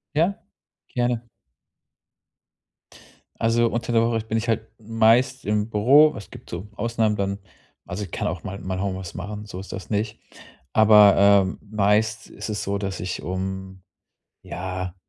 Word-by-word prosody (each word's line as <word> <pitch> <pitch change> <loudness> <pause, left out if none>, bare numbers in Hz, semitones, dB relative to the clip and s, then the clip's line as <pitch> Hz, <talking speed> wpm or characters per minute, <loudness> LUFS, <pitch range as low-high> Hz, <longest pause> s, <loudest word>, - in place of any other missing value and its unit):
Ja, 175 +6 +1 0.5
gerne. 120 -1 -1 2.1
Also 115 +1 +2
unter 120 +1 -3
der 115 0 +4
Woche 115 -1 +1
bin 110 0 -1
ich 115 +1 -4
halt 115 0 0
meist 115 +4 +2
im 105 +1 0
Büro. 135 +9 +5
Es 105 - -10
gibt - - -13
so 90 +4 -6
Ausnahmen 115 -2 0
dann, 100 0 -2 0.5
also 100 +4 -5
ich 90 - -12
kann - - -2
auch 85 +2 -5
mal 100 0 -5
mal 95 0 -4
Homeoffice 95 -3 -4
machen, 105 +3 -6
so 95 -3 -8
ist 95 - -9
das 95 +2 -7
nicht. 105 +1 -2 0.5
Aber, 105 -2 +7
ähm, 100 -1 +4
meist 110 +2 +1
ist - - -7
es 105 -1 -3
so, 100 0 -2
dass 95 -1 -4
ich 90 - -4
um 95 0 -5 0.6
ja, 90 0 -5
105 Hz, 155 wpm, -23 LUFS, 95-115 Hz, 2.1 s, Aber